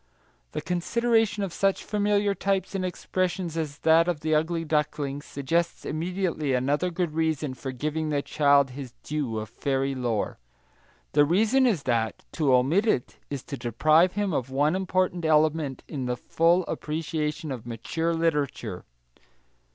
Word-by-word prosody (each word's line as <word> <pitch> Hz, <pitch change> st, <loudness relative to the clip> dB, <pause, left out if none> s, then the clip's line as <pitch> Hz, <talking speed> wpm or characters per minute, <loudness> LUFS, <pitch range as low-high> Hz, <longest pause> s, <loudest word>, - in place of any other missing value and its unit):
The -, -, -2 dB
consideration 225 Hz, +3 st, +1 dB
of 190 Hz, -4 st, -4 dB
such 195 Hz, -1 st, +1 dB
familiar 205 Hz, -1 st, +1 dB
types 195 Hz, -1 st, -1 dB
and 195 Hz, -1 st, -1 dB
expressions 185 Hz, -1 st, -2 dB
as 155 Hz, -3 st, -3 dB
that 165 Hz, +1 st, +5 dB
of 170 Hz, -4 st, -1 dB
the 155 Hz, 0 st, 0 dB
ugly 165 Hz, +2 st, +1 dB
duckling 150 Hz, -2 st, -1 dB
suggests 165 Hz, +5 st, -2 dB
immediately 165 Hz, -4 st, -1 dB
another 145 Hz, +8 st, +1 dB
good 175 Hz, -2 st, -2 dB
reason 155 Hz, -3 st, 0 dB
for 130 Hz, +1 st, -6 dB
giving 155 Hz, +4 st, -2 dB
the 145 Hz, -2 st, 0 dB
child 140 Hz, -2 st, +3 dB
his 130 Hz, -2 st, -8 dB
due 145 Hz, -7 st, -2 dB
of 110 Hz, 0 st, -4 dB
fairy 135 Hz, +1 st, -1 dB
lore. 120 Hz, -5 st, -2 dB, 0.7 s
The 145 Hz, -, +5 dB
reason 220 Hz, -, +3 dB
is 185 Hz, -, +1 dB
that 115 Hz, -3 st, -1 dB
to 150 Hz, -5 st, +1 dB
omit 140 Hz, -, +3 dB
it 130 Hz, -, 0 dB
is 140 Hz, -3 st, -4 dB
to 140 Hz, -, -6 dB
deprive 155 Hz, -, +3 dB
him 205 Hz, -3 st, -1 dB
of 130 Hz, -3 st, -1 dB
one 145 Hz, +5 st, +2 dB
important 185 Hz, -2 st, 0 dB
element 155 Hz, -3 st, +2 dB
in 135 Hz, -5 st, -4 dB
the 125 Hz, 0 st, -1 dB
full 170 Hz, +8 st, +2 dB
appreciation 155 Hz, 0 st, -3 dB
of 120 Hz, -3 st, -6 dB
mature 160 Hz, +9 st, -2 dB
literature. 160 Hz, -4 st, -1 dB
155 Hz, 150 wpm, -26 LUFS, 140-180 Hz, 0.7 s, that